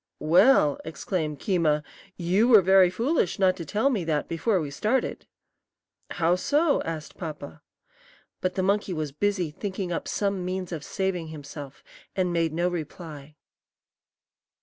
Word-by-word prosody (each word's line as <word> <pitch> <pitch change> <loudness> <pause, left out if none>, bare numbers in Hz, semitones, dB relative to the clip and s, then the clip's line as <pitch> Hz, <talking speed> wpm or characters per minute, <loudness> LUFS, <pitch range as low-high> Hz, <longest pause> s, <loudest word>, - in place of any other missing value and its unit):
"Well," 170 - +4
exclaimed 160 -1 -3
Keema, 155 -4 +1 0.3
"you 185 +6 +2
were 220 -6 +7
very 190 0 +6
foolish 230 - 0
not 185 -1 +3
to 170 - -6
tell 220 - +1
me 210 -8 -1
that 155 -2 -1
before 180 +5 0
we 150 -4 -4
started!" 215 - -1 0.8
"How 170 +1 +2
so?" 290 - +2
asked 160 -2 -6
Papa. 155 -4 -7 0.8
But 185 0 -2
the 185 - 0
monkey 200 0 +1
was 155 -3 -3
busy 185 +1 -1
thinking 190 +2 -4
up 170 - -3
some 200 -2 -1
means 185 0 -3
of 160 -4 -5
saving 185 -3 -2
himself, 145 -2 -9 0.3
and 180 -2 0
made 165 -2 +1
no 170 +3 0
reply. 155 -3 -6
180 Hz, 145 wpm, -26 LUFS, 155-195 Hz, 0.8 s, were